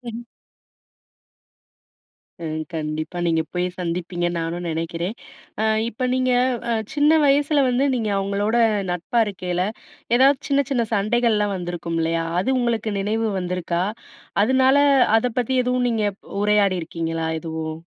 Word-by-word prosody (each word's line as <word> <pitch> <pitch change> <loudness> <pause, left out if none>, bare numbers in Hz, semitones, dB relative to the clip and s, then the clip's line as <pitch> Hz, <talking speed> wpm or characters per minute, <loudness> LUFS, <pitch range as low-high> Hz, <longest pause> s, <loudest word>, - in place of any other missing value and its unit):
சரி. 240 -2 -7 2.3
ம், 155 -1 -3
கண்டிப்பா, 155 +2 -3
நீங்க 165 -1 +2
போய் 180 0 0
சந்திப்பீங்கன்னு 175 0 -2
நானும் 170 +2 -3
நினைக்கிறேன். 165 +5 -3 0.7
இப்போ 240 +2 -4
நீங்க 255 0 +1 0.4
அ - - +2 0.2
சின்ன 295 0 +4
வயசில 285 0 +3
வந்து 250 +3 +2
நீங்க, 225 -4 -1
அவங்களோட 200 +3 0 0.3
நட்பா 180 +7 0
இருக்கையில, 180 -2 -2 0.5
ஏதாவது 270 +2 +5
சின்ன, 280 0 +2
சின்ன 240 -4 +1
சண்டைகள்லாம் 210 -1 +1
வந்திருக்கும் 175 -2 -4
இல்லையா, 165 0 0 0.2
அது 260 +6 +1
உங்களுக்கு 225 -3 -1
நினைவு 220 +3 0
வந்துருக்கா? 180 -1 -2 0.6
அதனால 260 +3 +4 0.4
அதை 245 +2 -1
பத்தி 250 +2 0
எதுவும் 250 0 +1
நீங்க 220 -2 0 0.4
உரையாடி 205 -3 +3
இருக்கீங்களா 165 0 -3
எதுவும்? 160 0 -5
200 Hz, 120 wpm, -22 LUFS, 170-240 Hz, 2.3 s, ஏதாவது